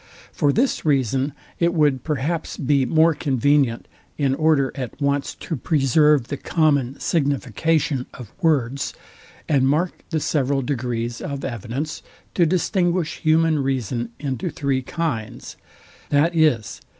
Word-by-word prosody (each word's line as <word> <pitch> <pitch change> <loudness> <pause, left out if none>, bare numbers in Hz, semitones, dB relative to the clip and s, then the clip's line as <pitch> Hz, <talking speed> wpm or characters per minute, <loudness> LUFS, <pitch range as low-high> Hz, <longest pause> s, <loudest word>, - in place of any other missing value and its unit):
For 145 - +2
this 255 - +1
reason, 135 -1 +1 0.3
it 170 0 +2
would 145 -5 +2
perhaps 155 +2 -2
be 135 -2 +1
more 160 +4 +4
convenient, 140 -3 +1 0.3
in 140 -3 +1
order 145 -2 +2
at 130 -1 -6
once 140 -1 0
to 165 - -5
preserve 150 -2 +3
the 145 - -3
common 140 -4 +1
signification 140 - 0
of 120 -5 -11
words, 140 -5 0 0.5
and 135 -4 +3
mark 160 +6 +1 0.2
the 160 - 0
several 140 -2 0
degrees 120 -3 -3
of 140 -1 -4
evidence, 125 +5 -4 0.3
to 170 -3 +3
distinguish 175 -1 0
human 160 0 +3
reason 125 -3 -2
into 135 -5 -3
three 135 -2 -1
kinds, 130 -6 -4 0.5
viz. 150 -5 +2
140 Hz, 125 wpm, -22 LUFS, 130-155 Hz, 0.5 s, more